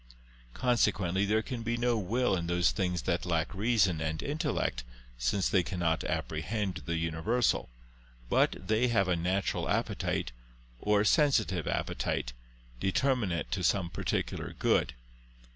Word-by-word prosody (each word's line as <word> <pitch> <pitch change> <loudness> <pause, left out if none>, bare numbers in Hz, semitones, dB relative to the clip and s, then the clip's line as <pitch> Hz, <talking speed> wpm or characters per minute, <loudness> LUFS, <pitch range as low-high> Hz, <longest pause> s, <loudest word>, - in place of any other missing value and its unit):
Consequently 100 -6 +2
there 110 +2 +1
can 125 -3 -5
be 115 +1 -1
no 120 0 +1
will 115 +2 +1
in 85 -2 -3
those 85 0 +2
things 90 -2 -1
that 85 -2 0
lack 85 -1 -1
reason 100 -5 +2
and 80 0 -2
intellect, 145 - -1 0.4
since 75 +11 +1
they 95 - +3
cannot 85 -1 -1
apprehend 90 +4 -2
the 85 - 0
universal; 85 - 0 0.6
but - - +3
they 110 +3 +3
have 100 -5 +2
a 90 - +2
natural 90 +3 -1
appetite - - -1 0.5
or 105 +5 +2
a - - +1
sensitive 110 - +2
appetite, - - -2 0.5
determinate 100 - 0
to 90 0 -1
some 85 0 +1
particular - - -3
good. 65 - +2
95 Hz, 135 wpm, -30 LUFS, 85-115 Hz, 0.6 s, they